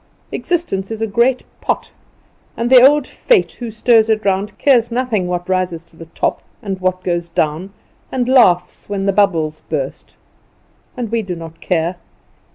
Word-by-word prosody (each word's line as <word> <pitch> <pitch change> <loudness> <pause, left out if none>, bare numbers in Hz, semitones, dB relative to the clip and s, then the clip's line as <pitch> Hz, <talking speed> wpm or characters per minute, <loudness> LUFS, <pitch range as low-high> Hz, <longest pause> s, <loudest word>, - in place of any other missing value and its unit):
Existence 320 - -2
is 225 -1 -5
a 225 - 0
great 235 +5 +1 0.2
pot, - - -2 0.7
and 235 +2 -1
the 255 -2 +9
old 285 +2 +5
Fate 460 - +1
who 240 -2 -7
stirs 225 0 +3
it 215 -1 +1
round 195 +1 -1
cares 245 -5 +3
nothing 235 -6 -1
what 175 0 -3
rises 185 -3 -1
to - - -25
the 165 0 -11
top - - -2 0.2
and 195 -5 -5
what 185 0 -1
goes 175 -1 -2
down, 165 +3 -1 0.4
and 250 -2 -1
laughs 235 -11 +3
when 195 -1 -2
the 195 - +2
bubbles 165 -6 +1
burst. 140 -4 -4 0.8
And 235 -3 -4
we 230 -1 +1
do 185 -4 -5
not 165 -1 -10
care. 170 0 -1
195 Hz, 165 wpm, -17 LUFS, 175-235 Hz, 0.8 s, the